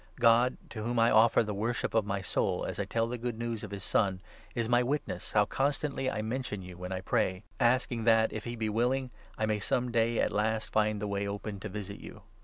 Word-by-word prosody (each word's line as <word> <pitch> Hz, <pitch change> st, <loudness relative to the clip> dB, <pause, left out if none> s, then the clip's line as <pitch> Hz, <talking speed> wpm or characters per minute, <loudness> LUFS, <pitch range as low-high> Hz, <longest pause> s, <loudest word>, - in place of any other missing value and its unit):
God, 120 Hz, +2 st, +5 dB
to 110 Hz, -, -5 dB
whom 120 Hz, +3 st, -2 dB
9 115 Hz, 0 st, +5 dB
I -, -, +3 dB
offer 115 Hz, +2 st, +6 dB
the 105 Hz, -1 st, -3 dB
worship 115 Hz, +4 st, -1 dB
of 110 Hz, -2 st, +2 dB
my 100 Hz, -1 st, -1 dB
soul -, -, 0 dB
as -, -, -4 dB
I -, -, 0 dB
tell 115 Hz, 0 st, 0 dB
the 120 Hz, +1 st, -4 dB
Good 120 Hz, -1 st, -3 dB
News 115 Hz, -1 st, -3 dB
of -, -, -5 dB
his 100 Hz, -1 st, -6 dB
Son, 95 Hz, -4 st, +1 dB, 0.4 s
is 115 Hz, -1 st, 0 dB
my 120 Hz, +1 st, +4 dB
witness 125 Hz, -8 st, -3 dB
how 105 Hz, -1 st, +5 dB
constantly 140 Hz, +2 st, -1 dB
I 110 Hz, -, -2 dB
mention 110 Hz, -4 st, -3 dB
you 90 Hz, 0 st, -9 dB
when 90 Hz, +1 st, -7 dB
I 95 Hz, 0 st, -2 dB
pray, 95 Hz, +1 st, 0 dB, 0.2 s
asking 120 Hz, -1 st, +2 dB
that, 115 Hz, -1 st, +4 dB
if 110 Hz, -, -4 dB
he 120 Hz, 0 st, -4 dB
be 110 Hz, -1 st, -2 dB
willing', 125 Hz, +4 st, 0 dB, 0.3 s
I 110 Hz, -, +1 dB
may 105 Hz, -1 st, 0 dB
some 125 Hz, +4 st, 0 dB
day 115 Hz, 0 st, +2 dB
at -, -, +2 dB
10 -, -, -12 dB
last 110 Hz, +1 st, 0 dB
find 105 Hz, -1 st, +2 dB
the 105 Hz, -, -3 dB
way 100 Hz, 0 st, -1 dB
open 100 Hz, 0 st, -5 dB
to 105 Hz, -, -6 dB
visit 100 Hz, 0 st, -6 dB
you. -, -, -11 dB
110 Hz, 245 wpm, -30 LUFS, 105-120 Hz, 0.4 s, offer